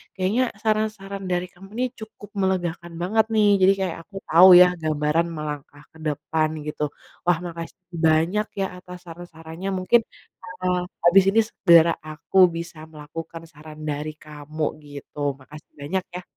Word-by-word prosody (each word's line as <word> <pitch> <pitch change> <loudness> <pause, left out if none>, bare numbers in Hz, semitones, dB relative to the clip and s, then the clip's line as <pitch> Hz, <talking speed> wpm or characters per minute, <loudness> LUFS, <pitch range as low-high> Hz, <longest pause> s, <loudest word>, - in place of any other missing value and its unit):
kayaknya 200 +7 +1 0.2
saran-saran 215 -3 -2
dari 180 0 -1
kamu 195 +2 -15
ini 255 - +2
cukup 215 -1 -11
melegakan 175 -2 -2
banget 215 +5 +2
nih. 210 -1 +4
Jadi 195 +1 +6
kayak 180 -3 -2
aku 195 +4 -21
tau 180 +3 +8
ya 180 - +8 0.2
gambaran 155 +2 +1
melangkah 150 -1 -7
ke - - -18
depan 155 +1 -1 0.2
gitu. 150 - -3 0.4
Wah, 175 -2 +3
makasih 170 +2 -8 0.2
banyak 170 +7 +2
ya 195 - +1
atas 180 0 -11
saran-sarannya 165 +1 -8
mungkin, 230 +6 +4 0.4
eee, 180 0 -2 0.3
habis 190 +2 +7
ini 225 - +3
segera 170 -3 +5
aku 155 +4 -5 0.2
bisa 170 -1 -7
melakukan 160 +2 -9
saran 155 -1 -13
dari 150 +1 -3
kamu 150 0 -5 0.2
gitu. 145 -1 -5
Makasih 150 +3 -14
banyak 185 +6 -2
ya. 180 - -4
170 Hz, 145 wpm, -23 LUFS, 155-190 Hz, 0.4 s, tau